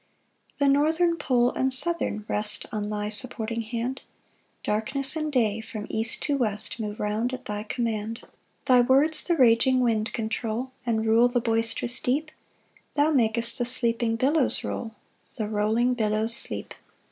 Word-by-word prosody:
3 285 Hz, -, +1 dB
The 275 Hz, -, +5 dB
northern 320 Hz, +4 st, +2 dB
pole 250 Hz, -5 st, +1 dB
and 265 Hz, 0 st, -1 dB
southern 260 Hz, -6 st, +1 dB
rest 210 Hz, 0 st, -2 dB
On 210 Hz, -1 st, -3 dB
thy 210 Hz, 0 st, -3 dB
supporting 230 Hz, +1 st, -2 dB
hand; 235 Hz, +3 st, -4 dB, 0.6 s
Darkness 265 Hz, +7 st, -1 dB
and 310 Hz, -1 st, -2 dB
day 225 Hz, -5 st, 0 dB
from 215 Hz, -1 st, -7 dB
east 225 Hz, +1 st, -1 dB
to 285 Hz, -2 st, 0 dB
west 215 Hz, -2 st, -2 dB
Move 210 Hz, -1 st, -5 dB
round 215 Hz, +4 st, -2 dB
at 255 Hz, 0 st, -13 dB
thy 210 Hz, -2 st, -4 dB
command. 225 Hz, 0 st, -4 dB
4 -, -, -20 dB, 0.4 s
Thy 250 Hz, -1 st, +5 dB
words 285 Hz, +5 st, +4 dB
the 345 Hz, -, 0 dB
raging 255 Hz, 0 st, +4 dB
wind 225 Hz, -3 st, 0 dB
control, 230 Hz, +2 st, -3 dB, 0.2 s
And 220 Hz, -1 st, 0 dB
rule 225 Hz, +2 st, +4 dB
the 245 Hz, 0 st, 0 dB
boisterous 230 Hz, +1 st, +3 dB
deep; 295 Hz, +5 st, -1 dB, 0.6 s
Thou 300 Hz, +1 st, +2 dB
mak'st 235 Hz, -4 st, +1 dB
the 245 Hz, -, 0 dB
sleeping 235 Hz, -2 st, 0 dB
billows 275 Hz, +4 st, +1 dB
roll, 225 Hz, -2 st, -5 dB, 0.4 s
The 220 Hz, -4 st, -3 dB
rolling 220 Hz, +4 st, +1 dB
billows 220 Hz, 0 st, 0 dB
sleep. -, -, +3 dB
235 Hz, 160 wpm, -25 LUFS, 220-260 Hz, 0.6 s, The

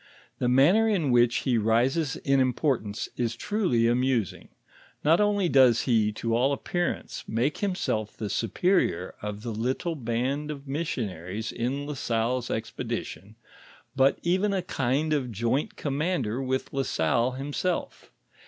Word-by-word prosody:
The 125 Hz, -, +1 dB
manner 175 Hz, -, +5 dB
in 170 Hz, -11 st, +1 dB
which 120 Hz, 0 st, +4 dB
he 125 Hz, -3 st, +2 dB
rises 125 Hz, +8 st, +1 dB
in 135 Hz, -1 st, +1 dB
importance, 125 Hz, -5 st, 0 dB
is 120 Hz, -2 st, -1 dB
truly 185 Hz, -, +1 dB
amusing; 120 Hz, -3 st, 0 dB, 0.5 s
not 165 Hz, +6 st, +4 dB
only 205 Hz, -3 st, +2 dB
does 130 Hz, -6 st, +5 dB
he, 110 Hz, -4 st, +2 dB
to 115 Hz, +1 st, -1 dB
all 130 Hz, +4 st, +2 dB
appear 175 Hz, +5 st, -1 dB
ance, -, -, -8 dB
make 120 Hz, +7 st, 0 dB
himself 180 Hz, -, -2 dB
the 110 Hz, -, -3 dB
superior 115 Hz, -, 0 dB
of 105 Hz, 0 st, -5 dB
the 120 Hz, -, -3 dB
little 130 Hz, +10 st, -2 dB
band 130 Hz, +4 st, -2 dB
of 140 Hz, -2 st, -7 dB
missionaries 110 Hz, -, -3 dB
in 135 Hz, +4 st, -2 dB
La 150 Hz, -, -4 dB
Salle's 120 Hz, -1 st, -1 dB
expedition, 110 Hz, -2 st, -5 dB, 0.6 s
bui 135 Hz, 0 st, +4 dB
even 190 Hz, +4 st, +1 dB
a 185 Hz, -, -1 dB
kind 140 Hz, 0 st, 0 dB
of 130 Hz, -5 st, -1 dB
joint 120 Hz, +7 st, -1 dB
commander 145 Hz, -5 st, -1 dB
with 130 Hz, 0 st, -2 dB
La 135 Hz, -, 0 dB
Salle 115 Hz, +4 st, +1 dB
himself. 145 Hz, -, -3 dB
130 Hz, 145 wpm, -27 LUFS, 115-150 Hz, 0.6 s, manner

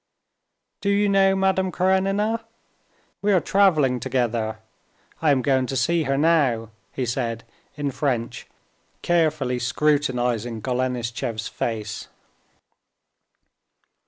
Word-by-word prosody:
"Do 200 Hz, -, 0 dB
you 205 Hz, +1 st, +3 dB
know 195 Hz, -1 st, +4 dB
Madame 190 Hz, -1 st, +1 dB
Karenina? 195 Hz, +5 st, +1 dB, 0.8 s
We 205 Hz, 0 st, +2 dB
are 185 Hz, -, +5 dB
traveling 155 Hz, -8 st, +3 dB
together. 120 Hz, -3 st, -1 dB, 0.6 s
I 160 Hz, -, +3 dB
am 135 Hz, -3 st, +3 dB
going 130 Hz, -2 st, +2 dB
to 135 Hz, -, -2 dB
see 165 Hz, +5 st, +1 dB
her 135 Hz, 0 st, 0 dB
now," 140 Hz, -8 st, +2 dB, 0.2 s
he 130 Hz, -, -3 dB
said 115 Hz, -1 st, -2 dB, 0.3 s
in 145 Hz, -1 st, -2 dB
French, 125 Hz, -4 st, -2 dB, 0.6 s
carefully 155 Hz, -7 st, +1 dB
scrutinizing 125 Hz, -4 st, 0 dB
Golenishtchev's 120 Hz, -3 st, -2 dB
face. 110 Hz, -2 st, -4 dB
135 Hz, 100 wpm, -23 LUFS, 120-180 Hz, 0.8 s, are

